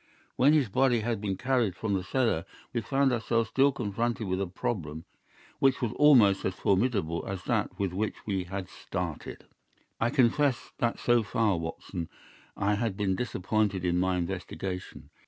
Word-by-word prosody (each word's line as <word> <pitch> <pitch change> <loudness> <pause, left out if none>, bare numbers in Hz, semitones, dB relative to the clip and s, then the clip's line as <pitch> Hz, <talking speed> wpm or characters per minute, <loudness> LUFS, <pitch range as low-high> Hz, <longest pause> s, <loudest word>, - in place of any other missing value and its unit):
When 140 +4 +5
his 150 -5 +3
body 125 +2 +2
had 110 -2 -2
been 100 -3 -2
carried 125 -7 +1
from 105 +2 -2
the 95 -2 0
cellar 115 -7 +1 0.3
we 120 - 0
found 135 +3 +2
ourselves 115 -1 0
still 135 +4 +4
confronted 115 -1 -2
with 95 +1 -1
a 100 - -1
problem 80 -4 -4 0.5
which 135 -1 +3
was 120 -4 -1
almost 120 -10 +5
as 95 - -1
formidable 95 -5 +1
as 95 -2 -4
that 95 - -1
with 100 -3 -1
which 105 +3 -1
we 95 -3 -1
had 95 +1 -5
started. - - -6 0.5
"I 115 - +2
confess 130 0 +2
that 120 -1 0
so 120 -1 +3
far, 105 -1 +1
Watson, 80 +1 -5 0.5
I 100 +1 +1
had 105 -2 -1
been 95 -2 +1
disappointed 100 -2 -1
in 90 0 +2
my 90 0 +1
investigation. 90 +1 -5
105 Hz, 165 wpm, -29 LUFS, 95-120 Hz, 0.5 s, When